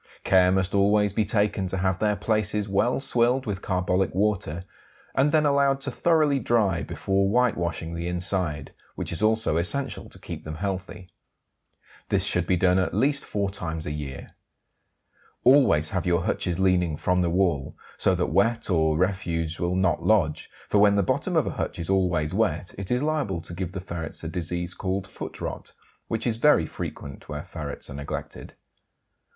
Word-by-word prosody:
Care 90 -1 +4
must 95 0 +1
always 100 0 +3
be 110 +1 +1
taken 105 -4 0
to 95 - -3
have 95 -1 0
their 105 -1 +2
places 105 0 0
well 105 +6 +1
swilled 125 0 +1
with 100 -3 -3
carbolic 90 -1 0
water, 95 -4 0 0.5
and 140 +2 +2
then 155 -1 +3
allowed 140 -1 +3
to - - -2
thoroughly 155 -5 +2
dry 105 -8 +1
before 95 +2 0
whitewashing 85 -8 0
the 85 +1 -4
inside, 90 -5 -1 0.2
which - - -4
is 85 - -2
also 110 -5 +2
essential 135 +12 0
to - - -11
keep - - -8
them 80 0 -6
healthy. 95 0 -5 1.0
This - - +2
should - - +2
be 90 - +2
done 90 +1 +3
at 95 - -1
least 140 +1 +1
four 100 -2 -2
times 80 -4 -4
a - - -3
year. 75 -3 -7 1.1
Always 125 - +5
have 90 -1 -2
your 85 -1 +2
hutches 90 -2 -1
leaning 90 -4 +2
from 90 +3 +1
the 85 - +1
wall, 85 -6 0 0.2
so - - +2
that - - -1
wet 115 -2 +2
or 80 -3 +2
refuse 85 -3 -1
will 85 +1 0
not 95 -3 +1
lodge, 95 -9 +1 0.2
for 105 - +2
when 100 0 +5
the 100 - +3
bottom - - -1
of - - +3
a - - -2
hutch - - -3
is 85 +3 -2
always 90 -5 +1
wet 95 -5 0
it 100 -1 -6
is 125 +3 +1
liable 150 - -1
to 85 - -8
give 90 0 -4
the 95 - -4
ferrets 85 -4 -5
a - - -3
disease 90 +1 -3
called 95 +1 -3
foot 95 - -8
rot, - - -6 0.3
which 115 - -2
is 115 -2 0
very 120 - +4
frequent 70 -2 -8
where 75 -1 -5
ferrets 75 -4 -6
are - - -8
neglected. 70 +1 -7
95 Hz, 180 wpm, -25 LUFS, 85-105 Hz, 1.1 s, Always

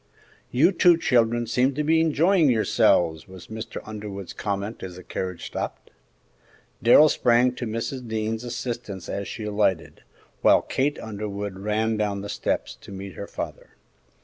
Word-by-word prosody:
"You 155 +9 +4
two 175 -3 +5
children 120 -5 +2
seem 125 +4 +1
to 150 - 0
be 160 +2 +3
enjoying 165 +1 +3
yourselves!" 90 -8 +2
was 95 -2 -12
Mr. 110 0 -6
Underwood's 105 -3 -7
comment 100 +2 -4
as 90 -2 -7
the 90 - -11
carriage 90 -1 -5
stopped. - - -5 0.9
Darrell 120 +6 +7
sprang 125 -2 +3
to 125 -1 -5
Mrs. 115 +3 -4
Dean's 110 +1 -2
assistance 120 -6 -5
as 100 0 -4
she 115 - -6
alighted, 105 -4 0 0.4
while - - +5
Kate 145 +3 0
Underwood 100 -2 -5
ran 110 +2 0
down 105 -2 -1
the 100 - -7
steps - - -2
to - - -12
meet 95 0 -7
her - - -7
father. - - -7
110 Hz, 150 wpm, -25 LUFS, 100-125 Hz, 0.9 s, Darrell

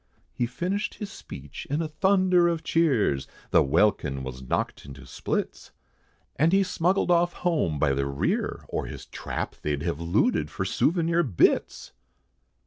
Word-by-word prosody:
He 120 - -1
finished 180 - -2
his 210 -2 -6
speech 70 - -9
in 145 +3 0
a 165 - -1
thunder 185 +1 +3
of 165 -2 -1
cheers, 125 - +2 0.2
The - - +6
welkin 70 -4 +1
was 65 0 -7
knocked 65 - -2
into 70 -1 -11
splits, - - -4 0.6
And 160 +3 +4
he 195 +1 +4
smuggled 180 0 +1
off 175 0 +3
home, 155 - 0
by 70 -2 +2
the 70 0 -1
rear, 70 0 -1
or - - -3
his - - -8
trap, - - -5
They'd 75 -1 -2
have 85 -3 -2
looted 85 +1 +1
for - - -3
souvenir 170 0 +2
bits! 120 - +1
145 Hz, 150 wpm, -26 LUFS, -, 0.6 s, The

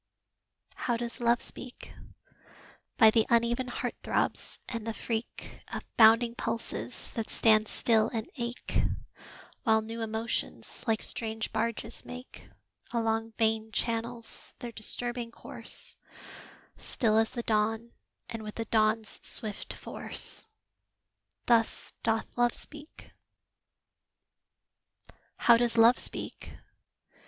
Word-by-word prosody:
How 240 -2 -1
does 235 0 -5
Love 235 0 +3
speak? 250 0 -10 1.0
By 220 -2 +8
the 225 -1 +3
uneven 235 +2 +3
heart 245 - -3
throbs, - - -1
and 230 -2 -4
the 225 - -2
freak 230 0 -4
Of - - -4
bounding 230 +1 +7
pulses 230 +1 -4
that 225 -2 -3
stand 215 -1 +4
still 220 -1 +2
and 225 -2 -3
ache, 235 -2 -2 0.8
While 220 -3 +3
new 225 +1 -5
emotions, 225 +1 -3
like 220 -1 +2
strange 220 -1 -2
barges, 230 +1 -2
make 250 +1 -10 0.4
Along 225 -1 0
vein 220 0 +1
channels 230 +1 -3
their 240 - -6
disturbing 240 +2 0
course; - - -6 0.8
Still 220 -3 +2
as 225 - +2
the 235 - -4
dawn, 225 +2 +1 0.4
and 225 -1 -5
with 210 -1 -7
the 225 - -3
dawn's 220 -1 +1
swift 215 -2 0
force - - -5 1.0
Thus 230 -2 +2
doth 225 0 +1
Love 240 -1 +3
speak. 300 +1 -8 2.2
How 235 -1 +6
does 235 -1 +1
Love 230 +2 +7
speak? - - -3
230 Hz, 110 wpm, -30 LUFS, 220-235 Hz, 2.2 s, By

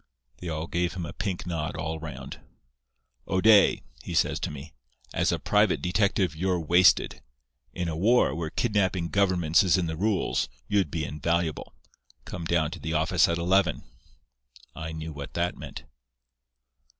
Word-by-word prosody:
"They 90 - -7 0.2
gave 90 +1 -1
him 90 -2 -4
a 75 - -7
pink 95 -3 -3
nod 80 -3 -3
all 80 0 -4
round. 80 -1 -8 0.9
"'O'Day,' 100 +2 +5 0.2
he - - -6
says - - +2
to - - -3
me. 75 +2 -9 0.4
'As - - +1
a - - 0
private - - +2
detective 95 -3 +1
you're 90 +2 0
wasted. 85 +2 +4 0.5
In 90 -1 -3
a 80 - -3
war, 105 - +3
where 80 0 -3
kidnapping 95 -5 0
governments 90 -5 +3
is 95 0 +3
in 90 - 0
the 80 -1 -3
rules, 100 - 0 0.2
you'd 100 -2 +1
be 80 -3 -2
invaluable. 80 +3 -2 0.5
Come 85 -2 -6
down 80 -2 +1
to 90 - -7
the 80 - -4
office 80 +3 +3
at 85 - 0
eleven.' 90 0 +2 0.9
"I 80 0 -6
knew 80 0 -6
what 70 -1 -8
that 85 +1 0
meant. - - -9
85 Hz, 155 wpm, -27 LUFS, 80-95 Hz, 0.9 s, O'Day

